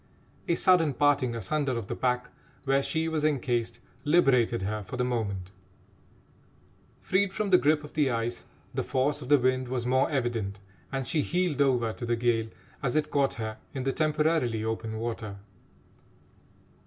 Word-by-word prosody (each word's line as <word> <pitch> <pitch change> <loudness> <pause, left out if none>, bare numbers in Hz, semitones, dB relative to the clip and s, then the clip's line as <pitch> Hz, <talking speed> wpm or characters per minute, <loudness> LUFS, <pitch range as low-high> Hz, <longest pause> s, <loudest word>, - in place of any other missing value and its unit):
A 170 - +2
sudden 165 -7 +4
parting 140 -4 +2
asunder 135 +1 -1
of 115 - -4
the - - -4
pack 125 0 -1 0.3
where 135 0 +2
she 160 +3 -1
was 160 -2 -1
encased 125 -6 0 0.2
liberated 130 - +3
her 105 +2 -2
for 100 +6 -7
the 125 - +1
moment. 100 -7 -2 1.5
Freed 190 +1 +1
from 200 0 -2
the 180 - +7
grip 150 +1 +2
of 150 - -11
the 150 -3 +2
ice, 115 0 -2 0.3
the - - -1
force 135 +3 0
of 125 - -8
the 145 - +7
wind 130 0 +1
was 125 -1 -2
more 130 +2 +2
evident, 120 -8 -2 0.3
and 135 -2 -3
she 155 - +1
heeled 175 -3 0
over 125 -5 +2
to 120 - -6
the 120 - +2
gale 115 -1 +1 0.3
as 125 +1 -1
it 155 - +1
caught 140 -1 +2
her 110 -1 -5 0.2
in 130 - -2
the 135 0 0
temporarily 150 -7 +1
open 110 0 -3
water. 110 -3 -4
130 Hz, 165 wpm, -28 LUFS, 115-150 Hz, 1.5 s, the